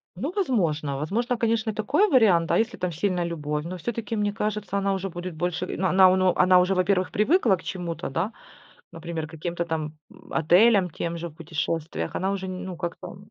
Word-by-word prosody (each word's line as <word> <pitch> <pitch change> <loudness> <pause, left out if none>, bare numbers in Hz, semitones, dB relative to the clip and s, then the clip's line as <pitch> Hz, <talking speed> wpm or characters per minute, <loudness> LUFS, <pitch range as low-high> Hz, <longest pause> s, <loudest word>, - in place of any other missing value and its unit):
Ну, 270 - -3
возможно 160 - 0
возможно, 230 - -1
конечно, 230 -1 0
и - - -10
такой 280 - +2
вариант. 210 - +4
А - - +4
если 225 - -1
там 180 -1 -2
сильная 180 +2 -1
любовь, 150 -3 -3
но 180 +2 -5
всё-таки, 230 +3 -4
мне 205 -1 0
кажется, 210 -2 -2
она 195 0 +1
уже 195 0 -3
будет 175 +1 -6
больше, 175 +2 -2
но 190 - +1
она 185 +1 +6
э, 185 -1 +3
она 180 0 +5
уже, 185 +2 +2
во-первых, 185 0 +1
привыкла 225 - +3
к - - -13
чему-то, 175 -5 -4
да, 170 +10 -1 0.6
например, 165 -1 -5
к 160 - -16
каким-то 170 +2 -3
там, 155 -2 -4
м, - - -17
отелям 180 +3 +4
тем 170 -1 -4
же 170 0 -5
в - - -18
путешествиях, 160 - -3
она 190 +2 0
уже, 190 -1 -3
ну, 185 -1 -6
как-то 175 +1 -6
185 Hz, 200 wpm, -25 LUFS, 165-205 Hz, 0.6 s, она